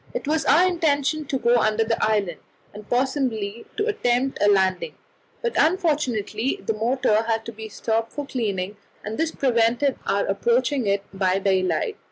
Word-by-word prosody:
It - - -4
was 315 +1 0
our 345 +5 +5
intention 310 -3 0
to 270 - -2
go 240 -1 +2
close 240 - +4
under 215 +1 +1
the 225 +1 -1
island, 205 -6 0 0.3
and 210 0 -11
possibly 245 -5 -1
to 420 - 0
attempt 265 - 0
a 205 - +4
landing; 190 -2 +2 0.5
but 475 - -1
unfortunately 285 - 0
the 225 - 0
motor 220 -1 +1
had 225 -1 -1
to - - -6
be 220 0 -9
stopped 225 +2 -2
for 290 - -5
cleaning, 205 -6 -3 0.3
and 215 +1 -5
this 325 0 +1
prevented 245 +1 +1
our 200 - +1
approaching 240 +5 +1
it 200 0 +1
by 190 -1 +1
daylight. 195 - 0
230 Hz, 170 wpm, -23 LUFS, 210-280 Hz, 0.5 s, our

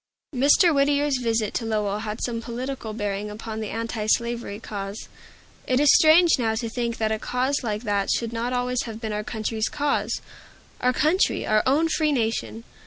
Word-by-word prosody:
Mr. 290 +6 +5
Whittier's 285 -1 +2
visit 225 -3 0
to - - -2
Lowell 210 -2 -1
had 215 0 -5
some 230 -2 -2
political 245 0 -5
bearing 205 -1 -3
upon 220 +1 -6
the 215 -2 -4
antislavery 230 -1 -2
cause. 200 -2 -6 0.6
It 255 0 +2
is 295 -1 +6
strange 325 -1 +6
now 225 -2 +1
to 230 0 -3
think 235 -1 -2
that 220 -1 0
a 220 - -1
cause 260 +4 -1
like 215 -1 -3
that 200 -3 0
should 230 -1 0
not 235 +2 -2
always 250 0 -1
have 225 -2 -7
been 220 -2 -4
our 210 0 -2
country's 220 0 -2
cause, 290 -1 -1 0.6
our 250 - +2
country, 315 - +1
our 215 0 +3
own 300 +5 +3
free 310 -1 +1
nation! 225 -2 -2
230 Hz, 175 wpm, -24 LUFS, 215-260 Hz, 0.6 s, is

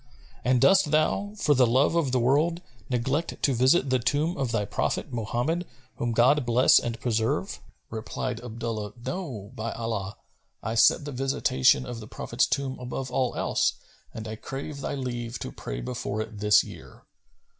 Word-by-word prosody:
And 125 0 +3
dost 185 +5 +5
thou, 160 +7 +1
for 150 -7 +3
the 130 -3 +4
love 130 +7 +3
of 165 -6 +1
the 130 - +2
world, 155 +8 +2 0.3
neglect 130 +6 -1
to 140 - +3
visit 130 +3 +3
the 130 - +3
tomb 145 +7 0
of 135 -4 -2
thy 105 -3 0
Prophet[FN#260] - - -2
Mohammed, 120 - -1 0.3
whom 120 - -1
God 130 +5 +4
bless 120 +2 +5
and 115 -1 -4
preserve?" 115 -2 -1 0.3
Replied 115 +2 -4
Abdullah, 115 -3 -4
"No, 130 - -5
by 115 -1 -4
Allah, 110 -4 -4 0.5
I 115 - -2
set 115 +5 +4
the 145 - -5
visitation 125 - +2
of 120 - -6
the 110 - -9
Prophet's 120 +3 0
tomb 135 -2 -2
above 125 +1 -5
all 125 -1 0
else, - - +1 0.4
and 110 0 -7
I 110 0 -5
crave 140 +4 -6
thy 140 - -3
leave 120 -3 -4
to 110 - -6
pray - - -6
before 100 - -4
it 110 -1 -5
this 105 0 +5
year." - - -12
125 Hz, 170 wpm, -27 LUFS, 115-140 Hz, 0.5 s, dost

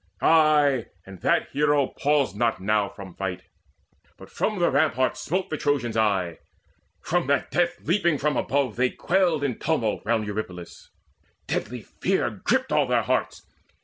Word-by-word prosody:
Ay, 150 -5 +4 0.2
and 95 -2 -12
that - - +1
hero 145 0 +2
paused 145 -2 0
not 115 -1 0
now 105 +1 +1
from 95 -3 -11
fight, 90 -2 -4 0.7
But - - -14
from 215 -1 -1
the 175 -1 +2
ramparts 135 -3 +1
smote 185 +3 -2
the 155 - -1
Trojans 140 -7 -1
aye. 95 -6 0 0.6
From 175 -4 -1
that 140 0 0
death 175 0 +1
leaping 170 -3 +1
from 150 +2 0
above 140 -3 0
they 125 +1 +2
quailed 175 -3 +1
In 130 -5 -2
tumult 135 -9 0
round 110 0 0
Eurypylus: 100 -4 -7 0.6
deadly 115 +1 -3
fear - - -1
Gripped - - -1
all - - +2
their - - +2
hearts. - - -2
135 Hz, 150 wpm, -25 LUFS, 110-155 Hz, 0.7 s, Ay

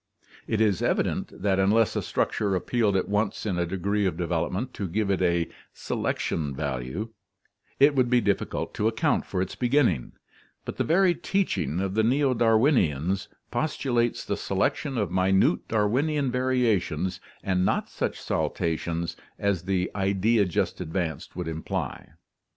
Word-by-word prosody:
It 110 - 0
is 105 -5 +2
evident - - -1
that 95 -2 +2
unless 105 +3 +3
a - - 0
structure 100 -2 0
ap 90 - -3
pealed 110 -5 +1
at 95 - +1
once 105 +1 -1
in 95 -5 -1
a 85 - 0
degree 100 +3 0
of 85 -3 -2
development 90 +8 -2
to 100 - -3
give 100 +3 0
it 95 - 0
a 85 -2 +2 0.3
"selection 75 -4 -2
value," 70 - -3 0.7
it 145 +2 +6
would 130 -3 +2
be 125 0 +4
difficult 100 -4 -1
to 105 - 0
account 110 0 +1
for 90 -2 0
its 95 - -6
beginning, 120 - +1 0.5
but - - -6
the - - +1
very 180 +2 +4
teaching 175 - -1
of 95 0 -1
the 110 - +3
Neo 130 +4 +3
Darwinians 110 - +2 0.2
postulates 120 -6 0
the - - -2
selection 135 -3 -1
of 100 -6 -1
minute 95 -1 +2
Darwinian 130 +6 +1
variations 115 -10 0 0.2
and 95 -1 +1
not - - +1
such - - -3
saltations 85 0 -2 0.2
as 100 -4 0
the 95 -1 0
idea 100 +2 +2
just 95 0 -1
advanced 80 -2 -3
would 90 -2 -4
imply. 80 0 -4
100 Hz, 150 wpm, -26 LUFS, 90-120 Hz, 0.7 s, it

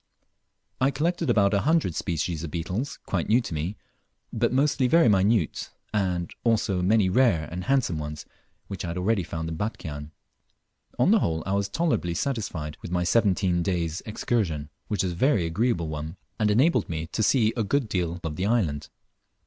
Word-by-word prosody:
I 130 - +3
collected 165 +4 -1
about 100 -1 +3
a 100 - +3
hundred 155 - +2
species 85 0 -2
of 85 - -4
beetles 90 - -3
quite 90 -4 -2
new 115 +3 +5
to 115 - -6
me, 80 +7 -3 0.6
but 115 +1 +1
mostly 135 0 +2
very 165 +1 +5
minute, 100 -2 +2 0.2
and 90 -4 -1
also 110 -5 +1
many 100 +2 +3
rare 95 - +3
and 90 +1 -5
handsome 130 - +1
ones 75 0 -6 0.4
which 95 -2 -5
I - - -3
had 85 +1 -4
already 100 +3 +1
found 80 -1 -5
in 80 -1 -4
Batchian. 80 -8 -5 0.9
On - - +4
the - - +6
whole 80 -1 -1
I 95 - -1
was 100 0 0
tolerably 120 - 0
satisfied 90 - -3
with - - -7
my 90 0 0
seventeen 95 -3 +2
days' 85 -3 -1
excursion, 90 -9 -1 0.2
which 105 -4 0
was 90 - -1
a - - -6
very 105 - +2
agreeable 85 0 0
one, 80 +3 -5 0.2
and 105 -1 +2
enabled 130 +11 +3
me 80 -1 -3
to - - -1
sea 110 0 +3
a 115 - 0
good 135 +4 0
deal 90 -3 -2
of 80 -2 -4
the 95 +2 0
island. 90 -11 0
95 Hz, 180 wpm, -26 LUFS, 85-115 Hz, 0.9 s, the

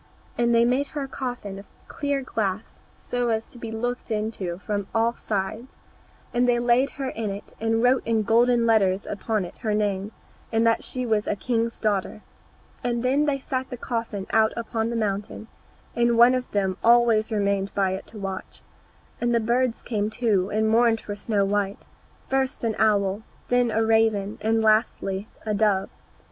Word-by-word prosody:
And 235 0 +2
they 230 - +5
had 235 - +4
made 265 +3 +1
a 280 -2 -2
coffin 245 -8 -5
of 200 - -13 0.2
clear 285 -1 -2
glass, 215 -4 -3 0.2
so 245 -1 -2
as 225 0 0
to 240 - -12
be 230 - -6
looked 245 +3 -3
into 210 -5 -2
from 205 0 -3
all 230 +1 +3
sides, 215 +3 -4 0.5
and 245 +1 +2
they 240 - +4
laid 240 +3 +3
her 270 -2 -2
in 220 -2 -3
it, 200 +1 -7
and 225 +1 +1
wrote 250 +1 +4
in 225 -1 +1
golden 235 +2 +3
letters 200 -4 +3
upon 210 -1 -2
it - - -11
her 215 -3 -1
name, 205 -1 -1 0.4
and 225 0 +2
that 230 0 +2
she 255 -1 -3
was 215 -3 0
a - - 0
king's 230 +2 -1
daughter. 210 0 -1 0.6
Then 255 +4 +1
they 290 -2 +1
set 260 -1 -3
the 250 - -6
coffin 230 -5 -3
out 220 0 +3
upon 230 -1 -2
the 235 - -3
mountain, 210 0 -3 0.5
and 235 0 +2
one 240 +2 +7
of 255 -1 -2
them 190 -2 0
always 230 -1 +4
remained 200 -2 0
by 195 -2 +2
it 190 - -5
to 220 - -10
watch. 195 -2 -6 0.6
And 240 0 +2
the - - +4
birds 240 +2 0
came 210 -3 -1
too, 215 -5 +1
and 215 +1 +1
mourned 225 0 +4
for 205 - -6
Snow 205 -1 0
white, 200 0 -1 0.4
first 265 -1 -1
an 225 -1 +1
owl, 205 -2 +2 0.3
then 245 -1 +3
a 225 0 +1
raven, 220 -2 +2
and 225 +1 +1
lastly, 215 -2 +1 0.2
a 215 - 0
dove. 200 -2 +1
225 Hz, 180 wpm, -25 LUFS, 205-240 Hz, 0.6 s, one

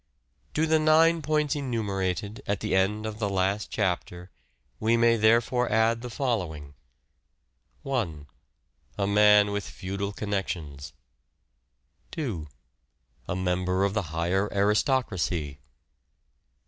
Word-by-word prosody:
To 155 - +2
the 160 0 +3
nine 160 +2 +4
points 150 -1 0
enumerated 105 - -2
at 100 -1 -1
the - - 0
end 105 +3 +1
of 110 0 -5
the 105 -3 0
last 100 +2 -1
Summary, 105 -3 +1
chapter 90 +1 -13 0.5
we 115 +2 +2
may 115 0 +4
therefore 115 +2 +2
add 110 +1 +2
the 125 - -6
following: 90 - -3 0.6
— - - -43
1. 100 - -2 0.7
A 100 - 0
man 105 0 +5
with 100 -1 -2
Feudal 100 +2 -4
connections. 85 -9 -4 1.2
2. 105 - -4 0.8
A - - -2
member 90 +1 0
of 100 0 +1
the 110 - 0
higher 90 +5 0
aristocracy. 100 - 0
105 Hz, 120 wpm, -27 LUFS, 95-115 Hz, 1.2 s, man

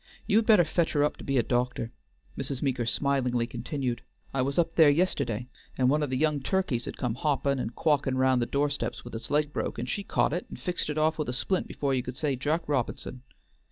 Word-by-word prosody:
You 205 - +3
had 225 - -2
better 210 -6 +7
fetch 165 +1 0
her 145 -2 +3
up 150 - 0
to - - -10
be 135 -1 0
a 120 - +4
doctor," 120 -1 -1 0.4
Mrs. 135 -1 -4
Meeker 125 -4 0
smilingly 125 -2 +1
continued, 120 +1 -3 0.3
"I 135 - +1
was 140 +2 -1
up 165 -1 +2
there 160 -3 +7
yisterday, 140 - +1 0.3
and 130 0 +3
one 150 +1 +2
of 145 - -1
the 130 - 0
young 150 0 +2
turkeys 140 -5 0
had - - -6
come 125 -3 -1
hoppin' 140 +1 0
and 115 -1 -4
quawkin' 140 -4 +1
round 130 -1 +3
the 120 - 0
doorsteps 145 -2 -1
with 120 - -9
its 115 - -6
leg 150 0 +1
broke, - - -2
and - - -3
she'd 200 -1 -3
caught - - +2
it 175 - -3
and - - -8
fixed 180 -3 -2
it 150 - -2
off 155 +1 +2
with 150 - -1
a - - -1
splint 185 +8 -1
before 140 -2 -1
you 130 - +1
could 125 +1 -7
say 145 -3 0
Jack 150 +6 -1
Robi'son. 130 -2 -2
140 Hz, 235 wpm, -28 LUFS, 125-155 Hz, 0.4 s, better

